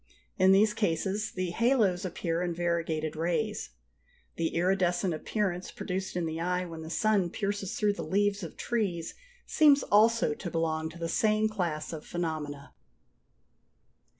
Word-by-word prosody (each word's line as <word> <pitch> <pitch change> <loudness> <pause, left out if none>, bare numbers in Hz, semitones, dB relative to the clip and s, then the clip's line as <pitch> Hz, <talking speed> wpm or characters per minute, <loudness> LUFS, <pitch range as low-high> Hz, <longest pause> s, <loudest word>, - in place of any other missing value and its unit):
In 185 +1 +6
these 210 +2 +5
cases 200 +2 -1
the 185 -2 -3
halos 215 -5 +2
appear 170 -1 -2
in 175 -1 -2
variegated 165 -2 -1
rays. 175 - -1 0.7
The 165 -1 -2
iridescent 180 0 +1
appearance 185 +2 -2
produced 185 0 -4
in 175 -2 0
the 160 0 -3
eye 180 +1 0
when 165 -2 -8
the 160 - -7
sun 200 0 +2
pierces 200 +2 -3
through 210 -2 +2
the - - -6
leaves 205 +1 +1
of - - -8
trees 195 -8 -2 0.3
seems 290 -3 +5
also 225 -4 +4
to 175 +4 -6
belong 160 -1 -1
to 165 - -11
the 165 0 -3
same 215 +4 +2
class 170 -8 -3
of 155 -1 -6
phenomena. 155 -4 -4
180 Hz, 150 wpm, -29 LUFS, 165-205 Hz, 0.7 s, In